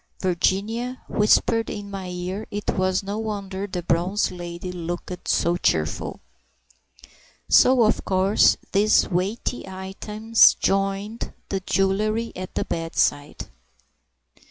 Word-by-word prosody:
(Virginia 205 +7 -1
whispered 225 +2 +2
in 205 -1 -6
my 195 -2 -5
ear, 180 +4 -5
it 205 0 -2
was 185 0 +1
no 200 +2 -4
wonder 200 -3 -4
the 180 -2 -5
bronze 180 +5 0
lady 175 0 -6
looked 175 +1 -6
so 170 +1 +2
cheerful.) 80 - -1 1.3
So 255 -2 +6
of 215 - +2
course 190 +2 +3
these 210 +2 +4
weighty 195 +6 -2
items 210 +4 +2
joined 195 +3 -1 0.2
the 195 - -1
jewellery 210 +4 0
at 185 0 -7
the - - -1
bedside. 165 -3 -1
195 Hz, 110 wpm, -23 LUFS, 180-215 Hz, 1.3 s, So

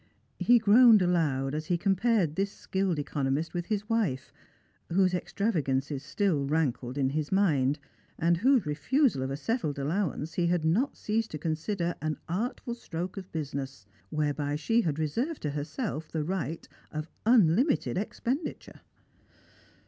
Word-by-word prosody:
He 245 - +6
groaned 220 -1 +7
aloud 150 -7 +1
as 155 +1 -3
he 175 - +1
compared 195 -3 +2
this 195 +1 0
skilled 190 -4 -1
econo 140 -2 -1
mist 155 +5 -1
with 175 -1 -3
his 210 -1 -2
wife, 210 - -1 0.6
whose 185 +1 +3
extravagances 150 -8 -1
still 155 0 0
rankled 140 -4 -1
in 135 -1 +1
his 150 0 -2
mind, 150 -8 +2 0.4
and 170 0 +2
whose 250 +1 +3
refusal 155 - +1
of 130 - -2
a 135 - -3
settled 160 - -2
allowance 155 +1 -2
he 175 -1 +1
had 170 -2 +1
not 215 - +1
ceased 220 +1 -1
to 155 - -5
consider 170 +3 -2
an 155 -1 -2
artful 235 +6 -3
stroke 180 -6 -5
of 190 -2 -8
business, 140 -7 -5 0.2
whereby 145 -1 -1
she 225 +11 +2
had 155 -8 -1
reserved 235 - -2
to 150 - -1
herself 155 - -4
the 155 -2 -1
right 170 -1 -3 0.2
of 155 +1 -4 0.2
unlimited 235 - +4
expenditure. 240 - -4
170 Hz, 150 wpm, -29 LUFS, 150-205 Hz, 0.6 s, groaned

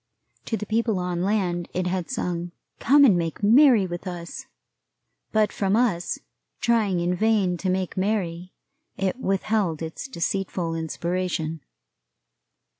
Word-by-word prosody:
To 225 - -1
the 210 - -5
people 225 -1 0
on 180 -1 -2
land 180 -3 0
it 185 0 0
had 180 -1 -2
sung, 175 -7 -3 0.3
"Come 285 +3 +6
and 210 -8 +6
make 170 +3 -2
merry 235 -1 +6
with 175 +1 -6
us," 175 -2 -7 0.8
but 215 -1 +2
from 195 0 +1
us, 220 -8 +1 0.4
trying 215 -6 +2
in 175 +1 0
vain 200 -2 +2
to 185 - -2
make 185 -1 -1
merry, 185 -3 -1 0.5
it 195 +5 -1
withheld 195 -5 0
its 160 +10 -6
deceitful 180 -5 -2
inspiration. 165 -1 -2
185 Hz, 130 wpm, -25 LUFS, 175-215 Hz, 0.8 s, Come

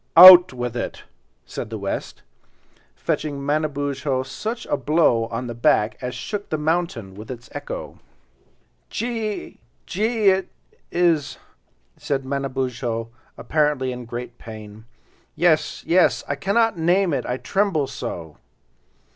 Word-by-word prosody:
"Out 180 0 +12
with 125 -2 -4
it," 120 - -4 0.4
said - - -6
the 110 - -5
West, 100 -1 -5 0.7
fetching 145 -2 -2
Manabozho 145 -2 -1
such 220 - -5
a - - 0
blow 140 -4 +2
on 115 +2 -4
the 120 - -5
back 115 -1 +2
as 125 0 -4
shook 205 -1 -5
the 155 - -1
mountain 150 - -1
with 105 +3 -11
its 125 -2 -8
echo. - - -7 0.9
"Je 235 - -2
ee, 220 -3 -4 0.3
je 195 +3 -3
ee—it 205 -5 +2 0.4
is," 170 -4 +1 0.6
said 135 -2 -2
Manabozho, 130 -4 -2 0.3
apparently 150 -4 0
in 125 -1 -7
great 120 +1 -7
pain. 110 -1 -10 0.5
"Yes, 160 -3 +2
yes! 180 +2 +3
I - - 0
cannot 200 +7 +1
name 175 +1 +2
it, - - -1
I 125 - -1
tremble 190 -3 0
so." 85 - -6
140 Hz, 130 wpm, -22 LUFS, 120-175 Hz, 0.9 s, Out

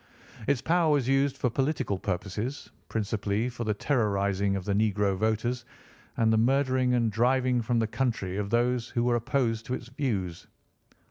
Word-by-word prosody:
Its 140 -3 +1
power 170 -1 +3
was 140 -4 +2
used 135 0 +2
for 125 - 0
political 135 -6 -1
purposes, 100 +8 -4 0.2
principally 105 +1 -1
for 120 -1 -5
the 105 - +1
terrorising 100 -6 +1
of 95 -2 -4
the 100 - 0
negro 105 -1 +1
voters 110 +4 0 0.5
and 110 -1 +3
the 110 - +4
murdering 130 +1 +2
and 115 -2 +1
driving 125 +2 +2
from 120 +1 0
the 115 - +2
country 110 -6 -2
of 100 -1 -2
those 120 +1 +1
who 120 -2 0
were 120 0 +2
opposed 115 -1 0
to 125 - -1
its 120 - -9
views. 105 - -3
115 Hz, 165 wpm, -28 LUFS, 105-130 Hz, 0.5 s, the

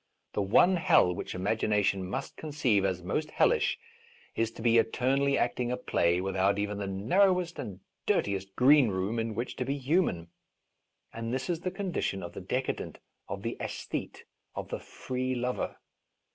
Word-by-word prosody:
The - - 0
one 175 - +5
hell 90 - +4
which 85 - -5
imagination 100 0 +1
must - - -4
conceive 140 -10 +1
as 95 -2 -1
most 150 - -1
hellish 470 - +2 0.6
is 115 -1 +1
to 110 - -9
be 115 -1 +5
eternally 135 +5 +2
acting 120 0 0
a 125 - -1
play 85 +1 +1
without 95 +1 +1
even 105 0 -2
the 100 - -3
narrowest 175 - +2
and 100 -5 -6 0.3
dirtiest 95 -1 0
greenroom 115 -6 +4
in 115 -1 -2
which 120 +3 -3
to - - -1
be 135 +3 -2
human. 130 - +1 0.8
And 115 0 -4
this 130 +6 -1
is 165 - -2
the 185 - -2
con 190 0 -4
dition 95 - -1
of - - -9
the - - -7
decadent, - - -3 0.3
of - - -5
the - - -2
aesthete, - - -5 0.3
of - - -5
the - - -3
free 130 0 -3
lover. 125 +1 -2
115 Hz, 165 wpm, -29 LUFS, 95-140 Hz, 0.8 s, one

